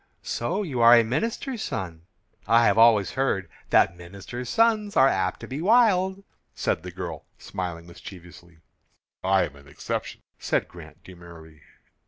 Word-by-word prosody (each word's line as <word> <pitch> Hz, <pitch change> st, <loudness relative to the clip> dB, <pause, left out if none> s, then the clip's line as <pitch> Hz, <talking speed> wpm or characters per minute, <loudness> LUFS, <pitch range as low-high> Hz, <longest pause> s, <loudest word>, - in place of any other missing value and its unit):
"So 120 Hz, -, -2 dB
you 135 Hz, -10 st, -3 dB
are 115 Hz, +1 st, +8 dB
a 115 Hz, -, +5 dB
minister's 225 Hz, -, -3 dB
son. 85 Hz, -, -5 dB, 0.4 s
I 115 Hz, +1 st, +5 dB
have 100 Hz, -, +3 dB
always 115 Hz, -4 st, +5 dB
heard 115 Hz, -9 st, -1 dB, 0.2 s
that 85 Hz, -, +3 dB
minister's 100 Hz, +8 st, -9 dB
sons 220 Hz, -3 st, +1 dB
are 130 Hz, -, +6 dB
apt 95 Hz, -7 st, -1 dB
to -, -, -8 dB
be 135 Hz, +4 st, -5 dB
wild," 195 Hz, -2 st, +3 dB, 0.3 s
said -, -, -1 dB
the -, -, -8 dB
girl, -, -, -7 dB
smiling 85 Hz, -2 st, -6 dB
mischievously. 85 Hz, -1 st, -13 dB, 0.6 s
"I 95 Hz, +1 st, +3 dB
am 70 Hz, -, -6 dB
an 70 Hz, -1 st, -17 dB
exception," 70 Hz, -, -5 dB, 0.2 s
said -, -, -1 dB
Grant, -, -, -14 dB
demurely. 85 Hz, -4 st, -14 dB
110 Hz, 150 wpm, -25 LUFS, -, 0.6 s, are